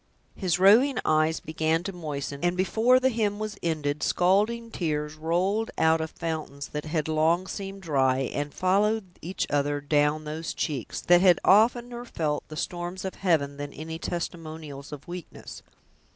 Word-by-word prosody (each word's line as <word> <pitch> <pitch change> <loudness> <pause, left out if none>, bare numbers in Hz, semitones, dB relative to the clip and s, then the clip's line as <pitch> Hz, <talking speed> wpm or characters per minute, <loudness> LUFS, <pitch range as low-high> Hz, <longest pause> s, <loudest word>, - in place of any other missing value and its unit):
His 180 -4 0
roving 225 +9 +5
eyes 155 +1 +2
began 160 +1 -1
to 195 +1 -4
moisten, 145 -4 -5
and 175 +1 +1
before 225 +7 +4
the 260 0 +3
hymn 215 -4 0
was 215 -1 -4
ended 150 -3 -1
scalding 210 +6 +1
tears 150 -5 -2
rolled 180 +8 0
out 160 0 +3
of 160 - -3
fountains 155 -4 -5
that 150 +1 -5
had 155 -1 -1
long 160 +3 +2
seemed 195 0 -6
dry, 135 -5 +2
and 145 0 -3
followed 195 +1 0
each 180 +4 -3
other 145 0 +1
down 150 +1 +1
those 155 +2 -5
cheeks, 140 -7 -3
that 175 0 +5
had 180 -2 +6
oftener 240 +4 +3
felt 155 -10 -2
the 155 - -9
storms 175 +3 -4
of 190 - -3
heaven 150 -7 0
than 145 0 -5
any 160 +2 -6
testimonials 160 -5 -6
of 145 -2 -9
weakness. 175 -1 -9
165 Hz, 160 wpm, -27 LUFS, 150-195 Hz, -, had